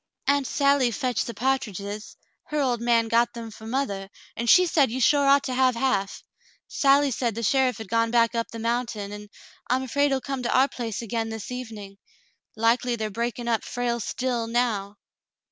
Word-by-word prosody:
"xA 280 Hz, -, +5 dB
unt 275 Hz, -2 st, -3 dB
Sally 280 Hz, -3 st, +3 dB
fetched 245 Hz, 0 st, -1 dB
the 235 Hz, -, -5 dB
pa'triges. 210 Hz, -4 st, -3 dB, 0.3 s
Her 300 Hz, -, -2 dB
old 250 Hz, -4 st, 0 dB
man 235 Hz, -1 st, +2 dB
got 235 Hz, +1 st, +2 dB
them 230 Hz, -1 st, -7 dB
for 220 Hz, +1 st, -11 dB
mothah, 205 Hz, -6 st, -2 dB, 0.3 s
and 235 Hz, 0 st, -2 dB
she 365 Hz, -, +7 dB
said 295 Hz, -6 st, +3 dB
you 250 Hz, +3 st, -3 dB
sure 280 Hz, +3 st, +4 dB
ought 280 Hz, 0 st, +5 dB
to 260 Hz, -, -3 dB
have 255 Hz, -1 st, +3 dB
half. 205 Hz, -6 st, -1 dB, 0.4 s
Sally 280 Hz, 0 st, +3 dB
said 235 Hz, -2 st, -1 dB
the 230 Hz, -, -4 dB
sheriff 260 Hz, +2 st, +2 dB
had 220 Hz, -3 st, -8 dB
gone 230 Hz, +2 st, +1 dB
back 230 Hz, 0 st, +3 dB
up 230 Hz, -1 st, -2 dB
the 230 Hz, -, -8 dB
mountain, 230 Hz, -3 st, -2 dB
and 210 Hz, 0 st, -9 dB, 0.4 s
I'm 255 Hz, +1 st, +1 dB
afraid 285 Hz, +3 st, +1 dB
he'll 270 Hz, -1 st, +1 dB
come 270 Hz, 0 st, -4 dB
to 245 Hz, -, +1 dB
our 265 Hz, +1 st, +5 dB
place 235 Hz, -4 st, -5 dB
again 225 Hz, 0 st, -2 dB
this 225 Hz, +1 st, -6 dB
evening. 215 Hz, -6 st, -8 dB, 0.6 s
Likely 235 Hz, +2 st, +2 dB
they're 215 Hz, -2 st, -3 dB
breaking 235 Hz, +2 st, -3 dB
up 230 Hz, -2 st, +1 dB
Frale's 240 Hz, -2 st, -2 dB
'still' 240 Hz, -2 st, -2 dB
now." 225 Hz, -4 st, -1 dB
235 Hz, 195 wpm, -25 LUFS, 225-260 Hz, 0.6 s, she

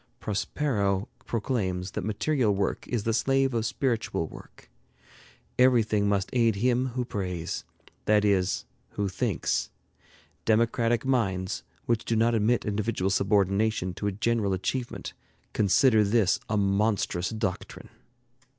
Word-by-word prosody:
Prospero 105 Hz, -1 st, -1 dB, 0.2 s
proclaims 100 Hz, -6 st, -2 dB
that -, -, -4 dB
material 110 Hz, +1 st, +1 dB
work 100 Hz, 0 st, -2 dB
is 120 Hz, -4 st, -2 dB
the 115 Hz, -, 0 dB
slave 135 Hz, +2 st, +2 dB
of 115 Hz, -1 st, 0 dB
spiritual 115 Hz, -, -1 dB
work. -, -, -14 dB, 0.9 s
Everything 110 Hz, -5 st, +4 dB
must 100 Hz, -2 st, 0 dB
aid 115 Hz, -3 st, +3 dB
him 125 Hz, +4 st, +1 dB
who 125 Hz, -, 0 dB
prays, 90 Hz, -7 st, -4 dB, 0.4 s
that 105 Hz, -1 st, +3 dB
is, 95 Hz, -2 st, +1 dB, 0.3 s
who 100 Hz, -1 st, -1 dB
thinks. 95 Hz, -, -1 dB, 0.7 s
Democratic 115 Hz, +2 st, +2 dB
minds, 95 Hz, -8 st, 0 dB, 0.2 s
which 115 Hz, -1 st, 0 dB
do 115 Hz, -, -1 dB
not 115 Hz, +2 st, +3 dB
admit 115 Hz, +2 st, +2 dB
individual 105 Hz, -2 st, -1 dB
subordination 100 Hz, 0 st, +1 dB
to 105 Hz, -, -3 dB
a -, -, +1 dB
general 105 Hz, 0 st, 0 dB
achievement, 120 Hz, +7 st, -3 dB, 0.4 s
consider 110 Hz, +2 st, +4 dB
this 100 Hz, -2 st, +2 dB
a 110 Hz, -, +1 dB
monstrous 100 Hz, -3 st, +1 dB
doctrine. 110 Hz, -5 st, -4 dB
105 Hz, 125 wpm, -27 LUFS, 100-115 Hz, 0.9 s, Everything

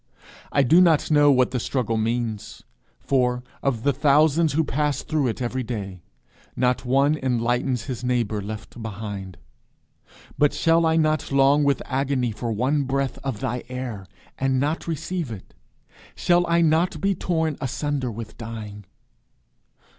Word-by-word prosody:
I 140 Hz, -, +3 dB
do 165 Hz, +8 st, +6 dB
not 165 Hz, -4 st, +3 dB
know 145 Hz, -1 st, +6 dB
what 130 Hz, -2 st, +3 dB
the 125 Hz, -, -1 dB
struggle 115 Hz, -2 st, -1 dB
means; 110 Hz, -1 st, -2 dB, 0.4 s
for, 125 Hz, -2 st, 0 dB, 0.2 s
of 125 Hz, -5 st, -1 dB
the 140 Hz, -, +2 dB
thousands 150 Hz, +3 st, +3 dB
who 160 Hz, +2 st, +2 dB
pass 145 Hz, -1 st, -1 dB
through 155 Hz, -4 st, 0 dB
it 120 Hz, +2 st, -3 dB
every 125 Hz, +2 st, -2 dB
day, 100 Hz, -7 st, -5 dB, 0.5 s
not 125 Hz, 0 st, +1 dB
one 140 Hz, +4 st, +2 dB
enlightens 125 Hz, 0 st, 0 dB
his 125 Hz, 0 st, -6 dB
neighbour 120 Hz, -4 st, 0 dB
left 110 Hz, +3 st, -8 dB
behind; 100 Hz, -3 st, -6 dB, 1.0 s
but 145 Hz, -1 st, +4 dB
shall 165 Hz, 0 st, +3 dB
I 160 Hz, -, +2 dB
not 155 Hz, -2 st, +1 dB
long 140 Hz, +2 st, +4 dB
with 140 Hz, -1 st, +1 dB
agony 130 Hz, -2 st, 0 dB
for 115 Hz, +2 st, -4 dB
one 135 Hz, +6 st, 0 dB
breath 135 Hz, 0 st, -1 dB
of 130 Hz, -6 st, -4 dB
thy 120 Hz, +1 st, -2 dB
air, 125 Hz, -7 st, -5 dB, 0.3 s
and 135 Hz, -1 st, +1 dB
not 150 Hz, +6 st, -1 dB
receive 165 Hz, -1 st, -3 dB
it? 105 Hz, -5 st, -9 dB, 0.6 s
shall 175 Hz, 0 st, +2 dB
I 170 Hz, 0 st, +3 dB
not 165 Hz, +3 st, +2 dB
be 195 Hz, 0 st, +1 dB
torn 160 Hz, -4 st, -1 dB
asunder 135 Hz, 0 st, -2 dB
with 115 Hz, 0 st, -8 dB
dying? 110 Hz, -3 st, -7 dB
130 Hz, 150 wpm, -24 LUFS, 115-150 Hz, 1.0 s, do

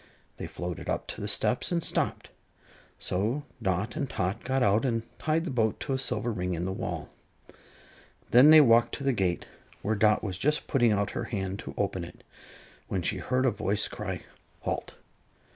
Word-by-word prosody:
They -, -, -5 dB
floated 90 Hz, -1 st, -5 dB
up -, -, -1 dB
to -, -, -6 dB
the -, -, -3 dB
steps -, -, +1 dB
and 170 Hz, -1 st, 0 dB
stopped, -, -, -1 dB, 0.7 s
so 110 Hz, +10 st, -1 dB, 0.2 s
Dot 95 Hz, -, -1 dB
and 140 Hz, -5 st, -2 dB
Tot 95 Hz, +4 st, -2 dB
got 130 Hz, 0 st, +1 dB
out 105 Hz, 0 st, +3 dB
and 115 Hz, -4 st, 0 dB, 0.2 s
tied 160 Hz, +2 st, +1 dB
the 165 Hz, -, -3 dB
boat 110 Hz, -4 st, +1 dB
to 135 Hz, -, -2 dB
a 130 Hz, -, 0 dB
silver 120 Hz, -2 st, -1 dB
ring 90 Hz, -4 st, -2 dB
in 85 Hz, +2 st, -2 dB
the 95 Hz, -, -2 dB
wall. 95 Hz, -, -4 dB, 1.2 s
Then 125 Hz, +5 st, +8 dB
they 155 Hz, 0 st, +10 dB
walked 115 Hz, -3 st, +5 dB
to 140 Hz, -, -7 dB
the 135 Hz, -1 st, +2 dB
gate, 95 Hz, -5 st, 0 dB, 0.4 s
where 110 Hz, -, +1 dB
Dot 105 Hz, 0 st, +3 dB
was 95 Hz, -4 st, -3 dB
just 150 Hz, +5 st, +1 dB
putting 120 Hz, -5 st, +3 dB
out 100 Hz, -1 st, +1 dB
her -, -, -3 dB
hand 95 Hz, -3 st, -3 dB
to -, -, -7 dB
open 95 Hz, -3 st, -1 dB
it, 85 Hz, -, -11 dB, 0.6 s
when 95 Hz, -2 st, -2 dB
she 95 Hz, -, 0 dB
heard 130 Hz, +8 st, 0 dB
a 130 Hz, -, +4 dB
voice 105 Hz, 0 st, 0 dB
cry: -, -, -5 dB, 0.4 s
"Halt!" -, -, -3 dB
110 Hz, 190 wpm, -28 LUFS, 95-130 Hz, 1.2 s, they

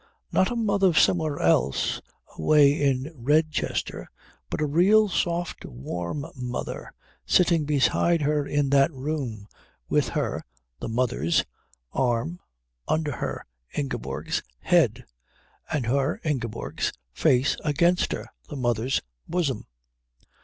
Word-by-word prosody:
Not 185 Hz, -, +3 dB
a 245 Hz, -, -3 dB
mother 200 Hz, -6 st, +2 dB
somewhere 155 Hz, -1 st, +3 dB
else, 70 Hz, -5 st, +2 dB, 0.3 s
away 140 Hz, -, +5 dB
in 140 Hz, -1 st, 0 dB
Redchester, 155 Hz, +4 st, 0 dB, 0.4 s
but -, -, -3 dB
a 155 Hz, -, +2 dB
real 190 Hz, +9 st, +5 dB
soft 175 Hz, -2 st, -1 dB
warm 85 Hz, -, -5 dB
mother 125 Hz, -1 st, -5 dB, 0.3 s
sitting 170 Hz, -, +3 dB
beside 150 Hz, +3 st, +2 dB
her 150 Hz, 0 st, +2 dB
in 145 Hz, -2 st, +1 dB
that 140 Hz, +3 st, +5 dB
room, 130 Hz, -7 st, -4 dB, 0.4 s
with -, -, +2 dB
her -, -, -2 dB, 0.4 s
(the -, -, -4 dB
mother's) 110 Hz, -, +1 dB, 0.5 s
arm 125 Hz, +7 st, 0 dB, 0.5 s
under 155 Hz, -1 st, 0 dB
her -, -, -4 dB, 0.3 s
(Ingeborg's) 120 Hz, -, -2 dB, 0.2 s
head, -, -, +3 dB, 0.7 s
and 150 Hz, -6 st, 0 dB
her 135 Hz, +4 st, +1 dB
(Ingeborg's) 120 Hz, -, -2 dB, 0.2 s
face 125 Hz, -, +3 dB
against 170 Hz, +4 st, +2 dB
her -, -, -4 dB, 0.2 s
(the -, -, -6 dB
mother's) 120 Hz, 0 st, 0 dB, 0.3 s
bosom. 170 Hz, -7 st, -1 dB
145 Hz, 110 wpm, -26 LUFS, 125-160 Hz, 0.7 s, away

